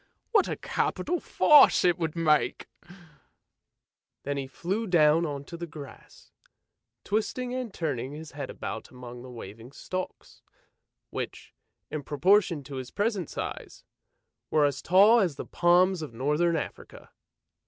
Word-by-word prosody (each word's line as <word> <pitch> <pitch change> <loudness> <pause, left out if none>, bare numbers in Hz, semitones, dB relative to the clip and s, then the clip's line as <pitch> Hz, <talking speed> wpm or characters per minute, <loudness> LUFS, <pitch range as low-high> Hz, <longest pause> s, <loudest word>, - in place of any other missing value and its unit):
What 420 -5 +4
a - - -2
capital 355 0 -1
farce 295 -9 +6
it 175 -1 +3
would 160 -1 -2
make! 150 -7 +1 0.8
" - - -60
Then 140 +1 -2
he 135 -1 -4
flew 195 - -3
down 165 -2 +4
on 140 -2 -5
to 170 - -8
the 170 0 -6
grass, 145 -3 -12 0.7
twisting 220 +4 -2
and 255 -3 -4
turning 135 -8 -3
his 155 +1 -9
head 145 -2 -6
about - - -6
among 125 -1 -10
the 130 - -10
waving 115 0 -10
stalks, 185 +4 -7 0.7
which, - - -6 0.4
in 155 - -3
proportion 165 +3 +2
to 135 -1 -8
his 130 -1 -6
present 205 -5 -1
size, - - -6 0.7
were 155 -2 +3
as 140 -2 -1
tall 205 +6 +6
as 180 -9 +1
the - - -6
palms 180 +1 +3
of 145 -7 -7
Northern 150 +7 +1
Africa. 155 - -7
160 Hz, 145 wpm, -27 LUFS, 140-190 Hz, 0.8 s, farce